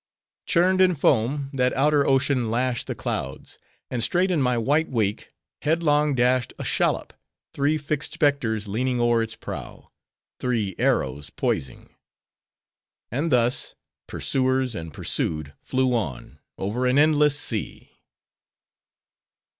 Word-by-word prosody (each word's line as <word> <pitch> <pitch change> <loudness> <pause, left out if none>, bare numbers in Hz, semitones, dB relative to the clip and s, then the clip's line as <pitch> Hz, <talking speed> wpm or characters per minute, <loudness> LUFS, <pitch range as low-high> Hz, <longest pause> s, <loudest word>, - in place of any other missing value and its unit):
Churned 185 +1 +3
in 185 -2 +4
foam, 135 +1 +1
that 125 -1 +1
outer 145 +1 +3
ocean 130 -3 +2
lashed 120 +1 -1
the - - -3
clouds; 65 +1 -5 0.3
and 120 -2 -1
straight 185 +6 +2
in 165 -5 +1
my 125 -2 +2
white 145 +8 +1
wake, 105 -5 -1 0.3
headlong 150 -2 +2
dashed 125 0 +2
a - - -5
shallop, - - 0 0.4
three 145 +2 +1
fixed 150 -1 -2
specters 115 -8 0
leaning 125 +5 -1
o'er 120 -1 +3
its 115 0 -3
prow: 115 - -8 0.5
three 115 -6 -1
arrows 70 +2 0
poising. 65 - -3 1.2
And 145 +7 -1
thus, 125 0 +1 0.3
pursuers 130 -1 0
and 80 -4 -6
pursued 75 0 -3
flew 130 -1 0
on, 70 - -4 0.2
over 115 +6 -1
an 125 +2 +2
endless 150 -1 +4
sea. 110 -7 -3
130 Hz, 125 wpm, -24 LUFS, 115-145 Hz, 1.2 s, in